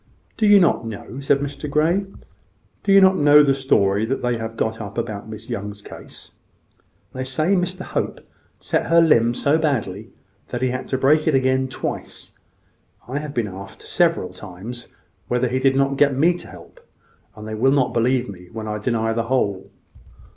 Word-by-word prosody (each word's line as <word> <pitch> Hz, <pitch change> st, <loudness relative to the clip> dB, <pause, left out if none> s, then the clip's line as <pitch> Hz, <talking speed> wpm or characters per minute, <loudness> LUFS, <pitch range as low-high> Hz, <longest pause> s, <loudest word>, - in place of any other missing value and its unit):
"Do 205 Hz, -2 st, +5 dB
not 175 Hz, -, +2 dB
you 115 Hz, -, -5 dB
know?" 110 Hz, +4 st, -8 dB
said 140 Hz, 0 st, +1 dB
Mr 145 Hz, +1 st, -5 dB
Grey. 165 Hz, +7 st, +1 dB, 0.7 s
"Do 195 Hz, -1 st, +5 dB
not 190 Hz, 0 st, +5 dB
you -, -, -1 dB
know 145 Hz, +1 st, +7 dB
the 140 Hz, -1 st, +3 dB
story 105 Hz, -7 st, +2 dB
they 125 Hz, 0 st, -1 dB
have 115 Hz, 0 st, -6 dB
got 110 Hz, +1 st, -2 dB
up 100 Hz, 0 st, -8 dB
about 110 Hz, -2 st, -4 dB
Miss 110 Hz, -1 st, -9 dB
Young's 100 Hz, 0 st, -6 dB
case. -, -, -11 dB, 0.8 s
They 130 Hz, -, -4 dB
say 155 Hz, +9 st, 0 dB
Mr 185 Hz, 0 st, -2 dB
Hope -, -, -3 dB, 0.4 s
set -, -, -1 dB
her 170 Hz, 0 st, +5 dB
limb 120 Hz, -8 st, +4 dB
so 145 Hz, +5 st, +2 dB
badly 115 Hz, -, -2 dB, 0.4 s
that 125 Hz, +1 st, -4 dB
he 130 Hz, -, +2 dB
had 130 Hz, +1 st, -4 dB
to 130 Hz, -, -1 dB
break 150 Hz, +4 st, +3 dB
it 155 Hz, -, +3 dB
again 130 Hz, 0 st, +2 dB
twice. 130 Hz, -, -6 dB, 0.7 s
I 135 Hz, +4 st, -3 dB
have 145 Hz, -1 st, -7 dB
been 115 Hz, -3 st, 0 dB
asked 95 Hz, 0 st, -10 dB
several 165 Hz, -, 0 dB
times 105 Hz, +6 st, -9 dB, 0.4 s
whether 125 Hz, +1 st, +1 dB
he 130 Hz, +2 st, -1 dB
did 135 Hz, 0 st, +2 dB
not 135 Hz, 0 st, +1 dB
get 140 Hz, -2 st, +3 dB
me 170 Hz, +5 st, +3 dB
to -, -, -11 dB
help -, -, -14 dB
him: 480 Hz, -, -28 dB, 0.5 s
and 105 Hz, 0 st, -9 dB
they 110 Hz, -, -5 dB
will 125 Hz, +5 st, +2 dB
not 135 Hz, -3 st, +1 dB
believe 125 Hz, +2 st, +1 dB
me 90 Hz, -3 st, -11 dB
when 110 Hz, -1 st, -6 dB
I 105 Hz, 0 st, -3 dB
deny 115 Hz, 0 st, 0 dB
the 115 Hz, 0 st, -1 dB
whole." 100 Hz, -7 st, -1 dB
130 Hz, 190 wpm, -21 LUFS, 110-145 Hz, 0.8 s, know